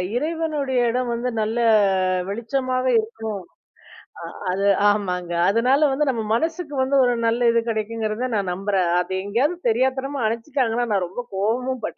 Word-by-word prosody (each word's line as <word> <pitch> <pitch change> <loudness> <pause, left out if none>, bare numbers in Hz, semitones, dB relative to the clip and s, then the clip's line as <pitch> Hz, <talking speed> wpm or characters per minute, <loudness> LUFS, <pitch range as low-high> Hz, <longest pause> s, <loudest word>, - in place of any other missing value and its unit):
இறைவனுடைய 300 -3 -1
இடம் 250 0 -1
வந்து, 240 +2 -2
நல்ல 215 +1 -1 0.7
வெளிச்சமாக 255 +4 -2 1.2
இருக்கணும்! - - -11 0.2
அது 195 +2 0 0.2
ஆமாங்க. 180 -4 -1 0.2
அதுனால 260 +7 +3
வந்து, 290 0 +1
நம்ம 230 -3 -3
மனசுக்கு 320 +2 -2
வந்து 275 +1 +1
ஒரு 245 -1 +2
நல்ல 235 +1 +2
இது 230 - +3
கிடைக்குங்கிறத 220 +2 -2
நான் 190 -3 -1
நம்புறேன். 195 -2 0
அத 180 +1 -3
எங்கேயாவது 265 - -1
தெரியாத்தனமா, 265 +4 0
அணைச்சிட்டாங்கன்னா, 240 0 -1
நான் 190 -2 +1
ரொம்ப 245 +7 -6
கோவமும் 240 +5 -1
பட்டுருக்கேன் - - -6
240 Hz, 135 wpm, -22 LUFS, 215-265 Hz, 1.2 s, அதுனால